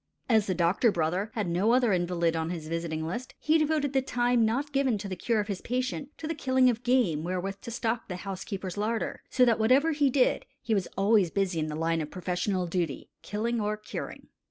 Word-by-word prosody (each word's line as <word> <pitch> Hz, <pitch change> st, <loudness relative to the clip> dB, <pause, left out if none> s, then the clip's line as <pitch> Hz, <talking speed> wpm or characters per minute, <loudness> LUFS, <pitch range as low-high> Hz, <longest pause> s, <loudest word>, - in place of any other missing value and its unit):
As 220 Hz, -5 st, +3 dB
the 185 Hz, -, 0 dB
doctor 180 Hz, +7 st, +3 dB
brother 180 Hz, +4 st, -1 dB
had 210 Hz, -5 st, -1 dB
no 185 Hz, +7 st, +2 dB
other 245 Hz, -4 st, +3 dB
invalid 175 Hz, -2 st, +1 dB
on 160 Hz, 0 st, -1 dB
his 165 Hz, -3 st, -5 dB
visiting 160 Hz, -1 st, -3 dB
list, 235 Hz, +10 st, -5 dB
he 315 Hz, +1 st, +2 dB
devoted 300 Hz, -2 st, +1 dB
the 265 Hz, -, +3 dB
time 245 Hz, -2 st, +2 dB
not 265 Hz, +7 st, 0 dB
given 270 Hz, -5 st, +2 dB
to 200 Hz, 0 st, -6 dB
the 190 Hz, -, -4 dB
cure 225 Hz, +5 st, 0 dB
of 205 Hz, -, -1 dB
his 200 Hz, -3 st, -4 dB
patient 255 Hz, +3 st, -2 dB
to 310 Hz, -, -5 dB
the 325 Hz, -, -1 dB
killing 260 Hz, -4 st, +3 dB
of 235 Hz, 0 st, -5 dB
game 245 Hz, -12 st, +2 dB
wherewith 185 Hz, +3 st, -3 dB
to -, -, -7 dB
stock 235 Hz, 0 st, -2 dB
the 180 Hz, -, -4 dB
housekeeper's 190 Hz, 0 st, -5 dB
larder; 220 Hz, +2 st, -2 dB
so 255 Hz, -1 st, +4 dB
that, 230 Hz, -2 st, +3 dB
whatever 260 Hz, +8 st, +4 dB
he 290 Hz, -2 st, +2 dB
did, 260 Hz, 0 st, +2 dB
he 230 Hz, -, -2 dB
was 195 Hz, -4 st, +1 dB
always 200 Hz, -2 st, +4 dB
busy 190 Hz, -2 st, 0 dB
in 155 Hz, -, -1 dB
the 150 Hz, -, -4 dB
line 165 Hz, +1 st, 0 dB
of 150 Hz, -, -5 dB
professional 185 Hz, +1 st, -1 dB
duty 170 Hz, -5 st, -3 dB
killing 225 Hz, +3 st, -2 dB
or 210 Hz, +1 st, -1 dB
curing. 210 Hz, -, -7 dB
210 Hz, 220 wpm, -28 LUFS, 180-245 Hz, -, so